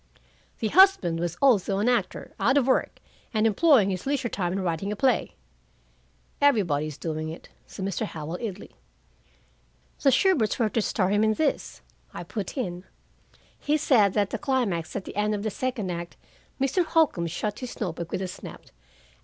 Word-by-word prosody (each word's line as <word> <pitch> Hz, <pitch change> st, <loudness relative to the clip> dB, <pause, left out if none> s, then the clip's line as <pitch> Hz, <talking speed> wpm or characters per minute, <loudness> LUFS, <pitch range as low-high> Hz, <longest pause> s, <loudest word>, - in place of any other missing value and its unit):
"'The 220 Hz, -, -1 dB
husband 340 Hz, -, +5 dB
was 175 Hz, -1 st, -3 dB
also 205 Hz, -7 st, +3 dB
an 210 Hz, +4 st, 0 dB
actor, 240 Hz, -6 st, -1 dB
out 265 Hz, +4 st, +3 dB
of 275 Hz, -, +3 dB
work, 260 Hz, -, +1 dB, 0.4 s
and 215 Hz, 0 st, +2 dB
employing 225 Hz, -, +4 dB
his 185 Hz, +6 st, -5 dB
leisure 275 Hz, -3 st, 0 dB
time 180 Hz, -4 st, -2 dB
in 190 Hz, -, -2 dB
writing 180 Hz, +2 st, -2 dB
a -, -, -2 dB
play.'" 260 Hz, +4 st, +1 dB, 1.1 s
"Everybody's 155 Hz, -, +2 dB
doing 155 Hz, -1 st, -4 dB
it," 160 Hz, -, -10 dB, 0.2 s
said 190 Hz, -, -6 dB
Mr. 195 Hz, +3 st, -2 dB
Howell 160 Hz, +1 st, -6 dB
idly. 205 Hz, -4 st, -6 dB, 1.3 s
"The 275 Hz, -, +5 dB
Shuberts 265 Hz, -, +2 dB
were 225 Hz, -3 st, +1 dB
to 225 Hz, -, 0 dB
star 190 Hz, -2 st, 0 dB
him 205 Hz, +2 st, +2 dB
in 220 Hz, 0 st, +2 dB
this," 305 Hz, +2 st, -2 dB, 0.3 s
I -, -, -5 dB
put 210 Hz, +3 st, -6 dB
in. 180 Hz, -8 st, -3 dB, 0.8 s
"He 300 Hz, +1 st, +1 dB
said 220 Hz, -10 st, +3 dB
that 205 Hz, -2 st, 0 dB
the -, -, -3 dB
climax 210 Hz, -, -1 dB
at 200 Hz, -, -4 dB
the -, -, -9 dB
end 210 Hz, +1 st, +1 dB
of 205 Hz, -, -4 dB
the 215 Hz, -, -2 dB
second 235 Hz, -4 st, -3 dB
act 170 Hz, 0 st, -6 dB, 0.2 s
" -, -, -35 dB
Mr. 275 Hz, +7 st, +2 dB
Holcombe 315 Hz, -, +2 dB
shut 205 Hz, +5 st, -3 dB
his 250 Hz, -2 st, -7 dB
note 180 Hz, -7 st, -3 dB
book 170 Hz, -1 st, -6 dB
with 190 Hz, -, -2 dB
a -, -, -2 dB
snap. 180 Hz, -, -9 dB
210 Hz, 180 wpm, -26 LUFS, 180-255 Hz, 1.3 s, husband